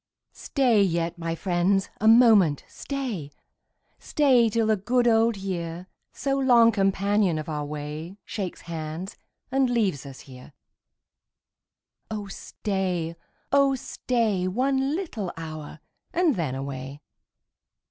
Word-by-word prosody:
Stat 240 -8 +2
yet, 170 0 -2
my 165 0 -2
friends, 190 +2 0
a 220 - +1
moment 220 - +6
stay 245 - -5 0.3
— - - -46
Stay 255 -6 +3
till 225 +1 +1
the 215 0 +3
good 240 +5 +1
old 225 -1 +3
year, 175 -3 -4 0.3
So 275 0 -1
long 240 -3 +6
companion 195 -2 +1
of 155 - -5
our 150 -2 -3
way, 150 +5 -6
Shakes 195 -5 -5
hands, 165 +2 -6 0.4
and 265 -1 +2
leaves 205 - 0
ns 135 -1 -10
here. 130 -2 -13 1.6
Oh 215 -2 -4
stay, 190 -4 -3 0.4
oh 275 -1 +4
stay. 225 -7 -1
One 265 +7 0
little 235 - -4
hour, 155 -2 -7 0.3
and 345 -3 +2
then 150 -7 -2
away. 135 +1 -6
195 Hz, 120 wpm, -25 LUFS, 165-235 Hz, 1.6 s, moment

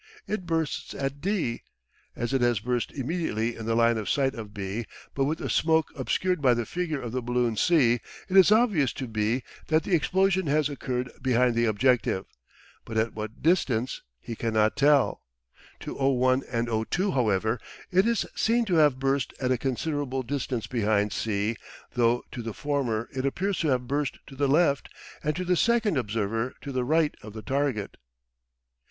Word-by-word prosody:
It 185 -5 -4
bursts 160 -2 -2
at 140 +1 -3
D. 180 - -1 0.5
As 120 +3 -3
it 135 - +2
has 120 -3 +3
burst 120 +2 -2
immediately 130 -6 -2
in 115 -1 -7
the 115 - +1
line 115 -1 +3
of 105 - -4
sight 135 -1 +1
of 110 -5 -8
B, 105 +2 -4 0.3
but 135 - +1
with 155 +3 -1
the - - -4
smoke 160 -1 +2
obscured 180 +6 0
by 125 -3 +4
the 120 -1 -2
figure 170 -2 -2
of 120 -3 -5
the 130 +1 -2
balloon 120 -1 0
C, 120 -3 +3 0.3
it 185 - -3
is 190 +1 +7
obvious 210 - +3
to 130 - -5
B 110 +3 0 0.2
that 155 0 +2
the 190 - -2
explosion 190 +1 +2
has 150 +1 +2
occurred 125 -3 -3
behind 125 -1 +3
the 115 0 +2
objective, 110 -3 +2 0.6
but 110 - -5
at 110 +1 +1
what 110 +1 -7
distance 135 -8 +1 0.2
he 115 - -7
cannot 110 -1 +1
tell. 140 -2 +3 0.6
To - - -5
O1 130 -1 +2
and 120 -1 0
O2, 120 - 0
however, 110 -2 +1 0.3
it 190 +4 +4
is 235 -2 +1
seen 235 +1 +2
to 185 -5 0
have 150 -4 +5
burst 135 0 0
at 130 -1 0
a 130 - +3
considerable 135 0 -2
distance 125 -2 -3
behind 105 -3 +1
C 110 +1 -1 0.4
though 120 0 +2
to 120 - -5
the 115 -2 -6
former 130 -7 -1
it 130 - -1
appears 190 +8 -1
to 160 - 0
have 125 -3 +1
burst 145 +1 -1
to 135 - -12
the 140 +1 +1
left 140 -1 +2 0.3
and 150 0 0
to 185 +2 -3
the 180 0 +2
second 225 -1 +2
observer 115 0 -1
to 140 - -6
the 130 -1 -1
right 155 +3 +2
of 105 0 -10
the 110 -1 -8
target. 135 -4 -1
130 Hz, 185 wpm, -27 LUFS, 115-155 Hz, 0.6 s, is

